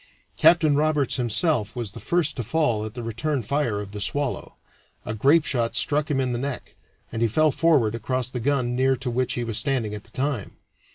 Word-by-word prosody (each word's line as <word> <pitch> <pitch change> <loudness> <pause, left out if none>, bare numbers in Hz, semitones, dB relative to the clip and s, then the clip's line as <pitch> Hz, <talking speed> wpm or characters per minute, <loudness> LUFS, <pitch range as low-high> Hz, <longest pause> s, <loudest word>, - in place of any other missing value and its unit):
Captain 155 -4 +5
Roberts 150 -2 +1
himself 120 - 0
was 120 -5 -4
the - - -9
first 170 -3 0
to 120 - -3
fall 120 -4 0
at 110 - -8
the 120 - -5
return 120 +4 -2
fire 120 -3 -1
of 100 -1 -7
the 105 0 -6
Swallow; 145 +4 -2 0.5
a 105 - -3
grapeshot 135 -1 +2
struck 150 +2 +1
him 140 -3 +1
in 130 -1 0
the 120 - -2
neck, 140 0 -5 0.4
and 115 - -4
he 115 - +4
fell 155 +7 +3
forward 140 -8 +2
across 125 +2 -2
the 125 -1 -5
gun 125 -1 0
near 130 +1 +2
to 130 -1 -4
which 125 +1 0
he 120 - -2
was 115 -2 0
standing 130 -7 -1
at 105 -1 -6
the - - -16
time. 130 -6 -3
130 Hz, 210 wpm, -24 LUFS, 115-145 Hz, 0.5 s, Captain